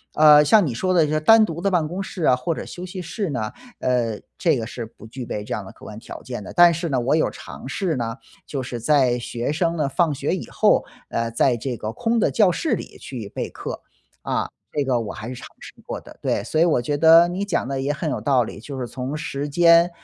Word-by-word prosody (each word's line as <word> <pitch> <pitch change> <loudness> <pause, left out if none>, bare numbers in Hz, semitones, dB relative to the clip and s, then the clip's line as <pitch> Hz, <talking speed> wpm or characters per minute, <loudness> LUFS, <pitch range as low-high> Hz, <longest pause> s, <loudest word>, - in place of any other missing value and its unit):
呃， 150 -1 +8
像 180 +5 +5
你 130 - -2
说 185 +11 0
的 155 -3 +2
单 225 +6 +7
独 170 -4 -6
的 200 +1 +1
办 170 -4 +2
公 180 +5 -4
室 180 -2 -6
啊 125 - +5
或 125 +7 -2
者 - - -6
休 180 - -8
息 185 0 -6
室 180 +3 -3
呢， 115 -7 -2 0.3
呃， 120 -4 0 0.2
这 165 -5 +2
个 115 -2 -4
是 120 -1 -6
不 110 -1 -14
具 125 +2 -7
备 105 -2 -5
这 - - -4
样 105 - -3
的 - - -10
客 - - -16
观 105 - -9
条 115 - -9
件 120 -5 -6
的， - - -9
但 175 -1 +6
是 170 +1 -3
呢， 135 -3 +1
我 125 +5 +1
有 155 - +2
尝 - - -10
试 170 +2 -1
呢， 115 -2 -3 0.3
就 140 - -4
是 120 -2 -6
在 130 -2 +3
学 120 0 -4
生 170 +1 0
呢 150 -3 +1
放 160 +2 +1
学 135 - -1
以 - - -7
后， - - +3 0.2
呃， 115 0 -2
在 120 +2 +2
这 120 +1 -4
个 110 +1 -5
空 230 - 0
的 - - +3
教 205 -5 +4
室 310 - -1
里 - - -9
去 115 -7 -7
备 - - -4
课。 - - -7 0.4
啊， - - -1 0.3
这 145 - +1
个 130 -3 +1
我 110 -3 -5
还 110 +2 -7
是 - - -5
尝 125 - -9
试 - - -11
过 - - -5
的。 - - -14
对， - - 0
所 155 +8 -1
以 165 - +6
我 155 -8 +2
觉 145 +4 -1
得 165 +2 +7
你 190 +3 -3
讲 180 -9 -1
得 135 0 -2
也 140 +2 0
很 155 +2 -3
有 - - -2
道 135 -4 +2
理， 110 - -8
就 135 +5 -8
是 125 - -2
从 130 +3 -5
时 145 -2 -4
间， 170 +3 +5
145 Hz, 275 characters per minute, -22 LUFS, 120-170 Hz, 0.4 s, 呃